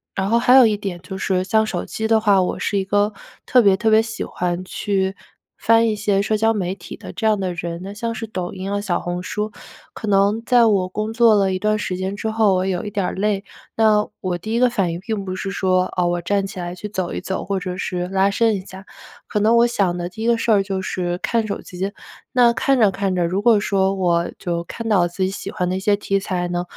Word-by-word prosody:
然 195 +1 -1
后 235 +1 +3
还 250 +1 +4
有 260 -3 +9
一 210 -2 +2
点 190 -4 -5
就 190 +1 -7
是 185 -1 0
像 220 +3 +2
手 - - -3
机 220 0 -3
的 220 -1 +3
话， 200 -3 +4
我 180 - -2
是 200 - -1
一 190 - 0
个 205 +2 +1 0.3
特 250 -1 +5
别 200 -3 +5
特 220 +2 +1
别 220 0 +6
喜 225 0 -5
欢 180 0 -3
去 190 0 -2 0.4
翻 230 0 +4
一 215 - 0
些 200 -1 +1
社 215 +1 0
交 225 +1 +2
媒 185 -3 -2
体 175 - -10
的 - - -9
这 220 - -1
样 215 -1 +3
的 185 -2 -2
人， 170 0 -5
那 200 +1 -7
像 230 +2 -3
是 225 - -4
抖 185 -3 -5
音 190 +1 -5
啊、 205 - 0
小 185 -4 -1
红 175 0 -3
书。 210 +3 -3 0.4
可 215 - -7
能 200 +2 +3
在 245 -2 +5
我 195 -4 +2
工 215 +3 -3
作 230 -2 +5
了 195 -2 +2
一 185 - -2
段 215 +1 +1
时 185 -3 -3
间 190 +2 -3
之 220 +1 -3
后， 215 -4 +3
我 185 +1 0
有 190 +3 -2
一 - - -3
点 200 -2 -1
儿 - - -2
累， 200 0 0 0.3
那 215 -2 +3
我 180 -2 -2
第 220 +6 -5
一 235 - +1
个 250 -1 +4
反 185 -7 0
应 170 - -5
并 215 -2 -3
不 185 0 -4
是 195 +1 -4
说， 185 -1 +1
哦， 175 -1 +2
我 175 0 -1
站 195 +2 0
起 195 -1 -10
来 175 0 -4
去 195 +3 -7
走 185 -4 -3
一 - - -3
走， 190 - -4
或 195 0 -2
者 180 0 -4
是 180 -2 -3
拉 195 +1 +2
伸 225 0 +2
一 190 - -4
下， 190 0 -12 0.4
可 210 - -1
能 225 +2 +4
我 235 +1 +5
想 190 -7 0
的 175 0 -3
第 220 +5 -7
一 - - 0
个 235 -1 +3
事 230 0 0
儿 200 -1 +3
就 195 -1 -3
是 175 -1 -2
看 225 +3 0
手 200 - -3
机。 190 +2 -5 0.4
那 240 -2 +4
看 270 0 +1
着 210 -3 +5
看 195 -1 -1
着， 175 -1 +1
如 190 +4 -1
果 225 -2 +5
说 195 -1 +1
我 175 -2 +1
就 170 -2 -2
看 230 +6 -7
到 190 -5 +3
自 185 +2 -3
己 185 - +1
喜 195 0 -6
欢 180 - -2
的 185 - -1
一 - - -2
些 205 0 +2
题 195 -1 0
材 180 -2 -2
呢， 175 0 -2
195 Hz, 285 characters per minute, -21 LUFS, 185-215 Hz, 0.4 s, 有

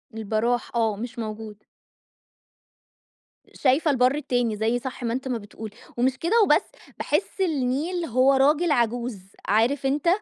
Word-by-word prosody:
البراح 225 +3 -1
آه، 225 -3 +1
مش 240 +1 -7
موجود. 215 -1 -7 1.9
شايفة 290 +3 +2
البر 255 +1 +3
التاني 245 -6 -1
زي 225 +3 0
صح 260 0 -7
ما 230 0 -1
أنت 265 +1 -4
ما 245 -2 -1
بتقول، 215 +1 -9 0.3
ومش 260 +2 +1
كده 440 - +2
وبس 300 -6 +4 0.4
باحس 390 - -1
النيل 320 +2 -1
هو 255 +2 +3
راجل 295 +5 +3
عجوز، 240 -4 0 0.3
عارف 235 +7 +2
أنت، 290 +5 0
250 Hz, 135 wpm, -24 LUFS, 225-280 Hz, 1.9 s, وبس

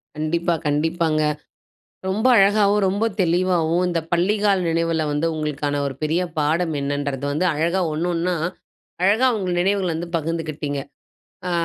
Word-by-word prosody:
கண்டிப்பா, 165 +3 0
கண்டிப்பாங்க. 155 +1 +1 0.9
ரொம்ப 215 +6 +1
அழகாவும், 205 +1 +4
ரொம்ப 200 +4 0 0.2
தெளிவாவும், 175 -1 +1
இந்த 170 -1 0
பள்ளி 180 +4 +2
கால 200 -2 +4
நினைவுல 165 -1 0
வந்து 150 +3 0
உங்களுக்கான 145 -1 -2
ஒரு 140 - -2
பெரிய 160 +4 +1 0.2
பாடம் 160 +3 +1
என்னன்றது 140 -1 -2
வந்து 155 +6 0
அழகா 170 +5 0
ஒண்ணு, 160 +3 -1
ஒண்ணா 175 +2 0 0.7
அழகா 210 +7 +4
உங்க 190 -3 -3
நினைவுகள 190 0 +1
வந்து 170 +2 -4
பகிர்ந்துக்கிட்டீங்க. 155 -3 -3 0.7
அ - - -2
165 Hz, 135 wpm, -22 LUFS, 155-185 Hz, 0.9 s, அழகாவும்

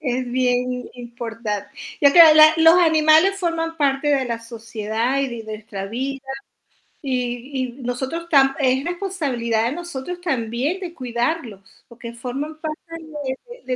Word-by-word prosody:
Es 255 -2 -2
bien 250 0 +1
im 250 0 -5
importante. 230 -4 -5 0.3
Ya 280 -1 +6
te 345 - +8
hab 320 -2 +10
la 310 0 +8
los 325 0 +7
animales 320 +3 +4
forman 330 -2 -2
parte 280 -1 +1
de 275 -2 +2
la 235 -2 -3
sociedad 230 +2 -3
y 275 - 0
de 235 -2 -6
nuestra 215 -2 -7
vida, 270 +5 -4 0.8
y 255 0 -3
y - - -10
nosotros 265 +7 -4
tam 270 -3 +4
es 265 0 +1
responsabilidad 285 - -1
de - - -4
nosotros 345 0 -6
también 270 - -2
de 360 -3 -6
cuidarlos, 240 -3 -3 0.3
porque 235 0 -10
forman 270 +6 -5
parte 310 -1 -5
de 300 -5 -6
de 485 +1 -12
265 Hz, 155 wpm, -21 LUFS, 240-315 Hz, 0.8 s, hab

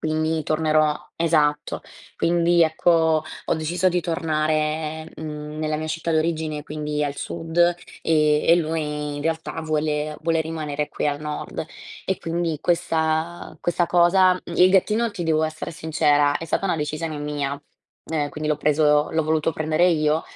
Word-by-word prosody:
quindi 155 0 0
tornerò 155 -1 +2 0.2
esatto, 150 -3 +1 0.3
quindi 170 0 +3
ecco, 160 0 +3 0.2
ho - - +2
deciso 170 +4 +1
di 180 0 0
tornare, 155 -1 -1
mhmm, 150 -1 -6
nella 155 0 -1
mia 155 +1 -4
città 160 +1 -2
d'origine, 155 -1 -1
quindi 150 0 -3
al 145 0 -3
sud 165 +3 -5 0.4
e 150 -2 +3
e 170 - +8
lui 150 -3 -2
in 145 - -5
realtà 160 +1 -2
vuole 150 -1 -1
vuole 165 0 +1
rimanere 155 -2 -3
qui - - -1
al 145 0 -2
nord 150 +1 -5 0.4
e 190 - 0
quindi 165 -1 -2
questa 160 -1 -1
questa 175 0 +1
cosa, 180 +2 +5
mhmm, 175 -1 -8
il 185 +1 +6
gattino, 215 +4 +2
ti 185 -4 -5
devo 160 -1 +2
essere 155 +1 -5
sincera, 150 -3 +2
è - - -6
stata 165 - -1
una 180 - 0
decisione 155 +1 -3
mia 145 -1 -3 0.5
e 150 -2 0
quindi 155 0 -4
l'ho 150 - +2
preso 150 0 +3
l'ho 160 -1 0
voluto 155 0 +1
prendere 155 +3 +2
io, 155 -1 +2
155 Hz, 155 wpm, -23 LUFS, 150-165 Hz, 0.5 s, e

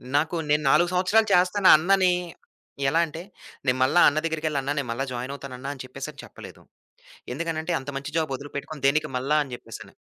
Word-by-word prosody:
నాకు 155 +4 +1
నేను 150 +1 +2
4 175 +5 +4
సంవత్సరాలు 195 +5 +3
చేస్తాను 185 +2 +3
అన్ననీ 185 +3 +3 0.8
ఎలా 165 +4 +2
అంటే 160 +1 -8 0.4
నేను 130 -1 +2
మళ్లీ 155 +7 +3
అన్న 150 +2 +2
దగ్గరకెళ్లి 155 -3 -1
అన్నా, 140 +2 -2
నేను 135 -4 -4
మళ్ళా 125 +4 -2
జాయినవుతానన్నా 130 +1 -6
అని 130 - -9
చెప్పేసి 135 +4 -7
చెప్పలేదు. - - -12 0.7
ఎందుకనంటే 165 0 -3
అంత 135 +1 -7
మంచి 140 - -8
జాబొదిలిపెట్టుకొని 145 0 -5
దేనికి 150 0 +1
మళ్ళా 140 +4 +1
అని 135 - -12
చెప్పేసని 115 -2 -11
150 Hz, 160 wpm, -25 LUFS, 135-165 Hz, 0.8 s, 4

